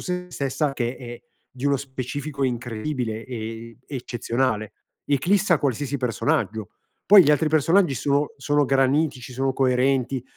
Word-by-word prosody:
sé 180 0 -4
stessa 140 0 -1
che 125 -1 -2
è 120 -2 -9 0.3
di 130 +2 -9
uno 140 -1 +3
specifico 140 +2 -4
incredibile 120 -1 -3
e 115 -1 -7
eccezionale, 120 -4 -2 0.3
eclissa 175 +5 +2
qualsiasi 140 +1 -1
personaggio. 110 -4 -1 0.4
Poi 200 -1 +10
gli 145 - +4
altri 150 +1 +3
personaggi 160 +1 +3
sono 140 +3 0
sono 145 +1 +1
granitici, 135 -1 +1
sono 135 +1 0
coerenti, 130 0 +1
135 Hz, 125 wpm, -23 LUFS, 120-145 Hz, 0.4 s, Poi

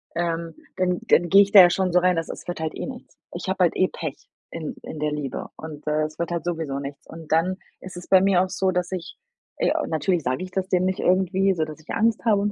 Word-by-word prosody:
ähm, 165 -1 -2 0.2
dann 180 -1 +1
dann 175 0 +4
gehe 195 +1 +8
ich 200 - -6
da 195 - +11
ja 175 - +8
schon 185 0 0
so 180 - +6
rein, 180 -1 +2
dass 165 - -2
es - - -8
wird 175 - -4
halt 160 -1 -3
eh - - -4
nichts. 255 -1 -10 0.2
Ich 175 +2 -6
habe 190 0 +1
halt 175 - +2
eh 185 - +4
Pech 155 -4 -6 0.3
in 160 -2 -5
in 155 - -7
der 150 0 0
Liebe 145 -4 -4
und, 155 -1 -10
äh, 155 0 +1
es 155 0 -6
wird 170 0 -2
halt 170 -2 -2
sowieso 160 -5 -2
nichts. 140 0 -8
Und 165 -1 -11
dann 175 +4 +2 0.3
ist 185 0 -9
es 175 - -9
bei 190 - +7
mir 190 -2 +4
auch 185 - -4
so, 190 0 0
dass 180 0 -2
ich 180 -3 -6 0.4
ey, - - +1 0.2
natürlich 165 0 0
sage 130 +8 -1
ich 185 - -8
das 190 0 -2
dem 180 -1 +2
nicht 185 0 -1
irgendwie, 190 +1 +2
so 160 - -1
dass 155 0 -7
ich 155 - -22
Angst 225 +1 +1
habe 210 -3 +3
und 205 - 0
175 Hz, 270 wpm, -24 LUFS, 160-185 Hz, 0.4 s, da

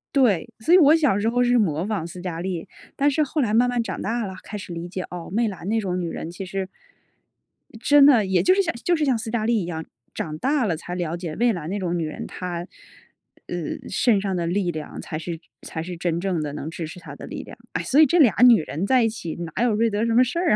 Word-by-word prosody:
对， 240 -7 +3
所 315 - -1
以 - - +9
我 310 -2 +7
小 285 -11 +2
时 215 - 0
候 245 +2 +2
是 245 0 +3
模 175 -3 +1
仿 205 -7 -2
斯 175 +1 -8
嘉 175 -3 -4
丽。 175 -2 -4 0.3
但 285 +1 +3
是 305 +2 +2
后 300 +2 -1
来 230 -5 +1
慢 235 +3 +4
慢 245 -1 0
长 - - -4
大 230 +2 -1
了， 190 - -7
开 210 - -8
始 190 -3 -7
理 170 +1 -5
解， 185 +1 -5
哦， 175 -1 -7
媚 230 +2 +1
兰 190 -3 -6
那 225 +2 +1
种 185 -2 -2
女 175 - -2
人 165 - -5
其 180 +3 -7
实 190 +1 -4 1.1
真 290 0 +6
的， 245 -8 +6
也 190 -1 +2
就 370 - +5
是 395 - +3
像 330 - -1
就 350 - +3
是 310 - 0
像 260 -4 +2
斯 225 0 -5
嘉 220 -2 0
丽 230 -3 +2
一 - - -3
样， 160 -2 -5 0.3
长 155 -1 -4
大 275 - +1
了 175 -6 0
才 175 +2 -6
了 170 -1 -2
解 170 -3 -5
媚 235 0 +2
兰 170 -3 -5
那 205 - -2
种 175 -2 -1
女 165 - -1
人 155 - -6
她， 175 -1 -5 0.8
呃， - - -5
身 215 -6 +2
上 195 -2 -2
的 170 -1 -1
力 175 0 0
量 155 -1 -7
才 155 - -5
是 165 +1 -5 0.2
才 160 - -5
是 175 0 -6
真 170 -1 -1
正 180 -3 -1
的 145 -1 -4
能 150 +1 -5
支 165 -1 -5
持 180 +3 -10
她 170 - -10
的 - - -9
力 - - -6
量。 - - -12 0.2
哎， - - -1
所 280 - +2
以 315 - +9
这 340 +5 +2
俩 240 - +6
女 235 -8 +7
人 165 +5 -3
在 255 +2 +4
一 225 - +3
起， 170 -7 -6
哪 170 +5 -3
有 240 -3 +3
瑞 230 +2 +2
德 210 +1 0
什 230 - +1
么 245 +2 +6
事 255 +7 -2
儿 350 -2 +3
195 Hz, 290 characters per minute, -23 LUFS, 170-240 Hz, 1.1 s, 以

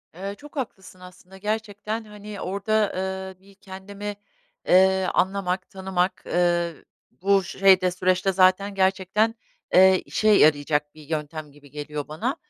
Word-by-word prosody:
Eee, 195 +3 -5
çok 295 +1 -14
haklısın 190 -9 -6
aslında. 180 +1 -14
Gerçekten, 215 +1 -3
hani, 210 -1 -10
orada, 200 +2 0 0.5
eee, - - -33
bir 200 - -18
kendimi, 200 +2 -8 0.5
eee, 190 +1 +5
anlamak, 185 0 0
tanımak, 190 -1 -2
eee, 175 -1 +1 0.4
bu 195 +1 +1
şeyde, 185 0 +3
süreçte 185 +1 +1
zaten 190 +2 +3
gerçekten, 195 +4 +1 0.4
eee, 190 0 +6
işe 215 - 0
yarayacak 150 -5 +3
bir 155 - -13
yöntem 155 -1 -4
gibi 145 -1 -19
geliyor 150 0 -6
bana. 200 - -3
190 Hz, 130 wpm, -24 LUFS, 180-200 Hz, 0.5 s, eee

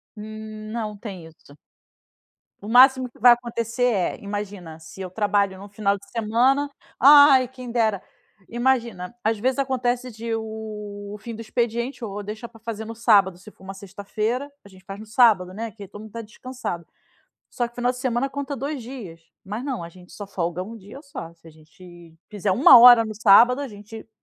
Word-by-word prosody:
Hum, 215 0 -9
não 220 -2 -4
tem 195 -5 -9
isso. 155 -3 -19 1.1
O 205 - -9
máximo 255 +2 +5
que - - -23
vai 245 +2 +8
acontecer 235 0 -1
é, 185 -4 -1
imagina 200 -5 -6
se 160 +3 -14
eu 185 -1 -5
trabalho, 200 0 0
num 200 +2 -11
final 200 0 0
de 200 - -18
semana 245 +6 +1 0.3
ai 280 -2 +7
quem 255 -1 -10
dera, 220 -5 0 0.5
imagina, 235 -5 -1
às 220 0 0
vezes 260 +4 0
acontece, 250 -2 -1
de 225 +1 -5
o 210 -2 -7
fim 230 +2 -8
do 225 - -10
expediente, 235 +3 -3
ou 205 -2 -5
deixa 215 +3 -7
para 225 - -18
fazer 220 -1 -6
no 225 - -7
sábado, 200 -5 +3
se 190 +4 -14
for 190 - -22
uma 190 0 -8
sexta 195 +1 -11
feira, 235 +8 -2
a - - -12
gente 190 -1 -18
faz 195 +1 -9
no 215 - -10
sábado, 215 -5 +3
né, 225 +3 -5
que 205 -2 -11
todo 205 +2 -11
mundo 220 - -11
está 230 +2 -7
descansado. 230 -5 -7 0.6
Só 240 -1 -3
que 240 - -25
final 245 0 0
de 250 - -10
semana, 255 +1 -1
conta 280 0 -5
2 280 +1 -4
dias, 225 -10 -9 0.2
mas 210 +6 -6
não, 250 -12 -4
gente 180 +1 -17
só 205 - -8
folga 180 -2 -3
1 230 +3 -9
dia 210 +6 -12
só. 225 - -9
Se 165 0 -23
a - - -12
gente 165 +2 -17 0.2
fizer 205 -2 -2
1 250 +5 +8
hora 240 -1 +9
no 215 -1 -6
sábado 230 +5 +5
a 285 - -4
gente, 215 +1 -11
220 Hz, 195 wpm, -23 LUFS, 200-245 Hz, 1.1 s, hora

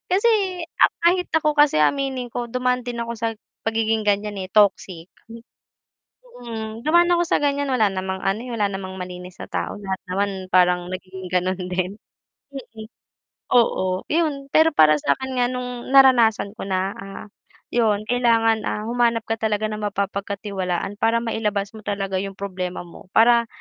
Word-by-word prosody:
kasi 405 +5 +3 0.7
kahit 360 +2 +2
ako 305 -2 +1
kasi 290 - +4
aminin 265 - 0
ko, 240 +1 -4
dumaan 250 +1 -1
din 240 -1 -4
ako 235 0 -4
sa 230 +1 -1 0.4
pagiging 225 -1 0
gan'yan, 205 0 0
eh, 185 - -5
toxic. 190 -4 +2 1.3
Mm 225 -1 -6
dumaan 345 +2 +5
ako 345 0 +3
sa - - +2
gan'yan 285 0 0
wala 220 -5 +3
namang 190 0 -3
ano, 195 +3 0
eh, 250 - -7
wala 210 -2 +1
namang 190 -1 -6
malinis 180 0 -8
na - - -6
tao - - -3
lahat 190 -1 -4
naman 200 +2 0 0.2
parang 180 -1 +3
nagiging 185 0 -7
ganon 185 +1 0
din. 185 +2 -2 0.6
mm, 225 -5 -9 0.7
oo 185 -6 +2
yun. 300 -4 0
Pero 320 +1 +6
para 155 -1 +6
sakin 260 - -1
nga 245 - +3
nung 250 -1 -5
naranasan 235 -7 +5
ko - - -5
na, 190 +1 -1
ah, 195 +1 -9 0.5
yun 215 -3 +2
kailangan, 230 -3 +2
ah, 210 - -3
humanap 235 -2 +1
ka 225 - +1
talaga 215 -1 0
ng 215 0 -5
mapapagkatiwalaan 200 -1 -3
para 225 +1 +3
mailabas 210 -3 -2
mo - - -9
talaga 195 -1 -2
yung 195 0 -5
problema 185 -2 -4
mo 170 - -14
para, 235 +1 +5
215 Hz, 160 wpm, -22 LUFS, 190-245 Hz, 1.3 s, Pero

